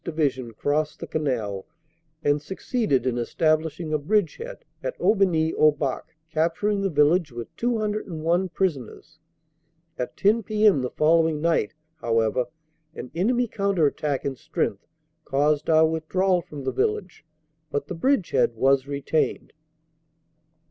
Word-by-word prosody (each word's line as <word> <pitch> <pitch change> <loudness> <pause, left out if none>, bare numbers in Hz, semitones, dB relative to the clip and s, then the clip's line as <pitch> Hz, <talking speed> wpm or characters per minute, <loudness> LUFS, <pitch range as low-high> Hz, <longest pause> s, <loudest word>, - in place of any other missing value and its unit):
Division 140 -7 -1
crossed 150 +5 -1
the - - -5
Canal 115 -11 -2 0.6
and 145 0 +2
succeeded 190 - -1
in 125 -2 0
establishing 155 +4 0
a 155 - +2
bridgehead 215 - -1 0.2
at - - -4
Aubigny 175 -6 +2
au 155 - +5
Bac, 145 +2 -4 0.2
capturing 170 +6 +1
the 195 - +1
village 155 +1 +3
with 120 -1 -8
201 195 -7 -1
prisoners. 165 - -3 0.8
At 125 - -4
10 215 +4 +3
p.m. 210 -6 +3
the 125 - -2
following 160 +1 +2
night, 160 -6 +1 0.2
however, 115 -2 +1 0.5
an 125 - -8
enemy 240 +8 +1
counter 200 -6 +1
attack 145 -1 -1
in 140 -1 -2
strength 100 -4 -3 0.4
caused 145 +2 +1
our 160 0 +6
withdrawal 175 +3 +1
from 150 -3 -9
the 130 - -1
village, 175 - -2 0.5
but 145 -1 -2
the 165 - -6
bridgehead 180 - +1
was 135 +3 +2
retained. 140 +2 -1
155 Hz, 125 wpm, -25 LUFS, 140-190 Hz, 0.8 s, our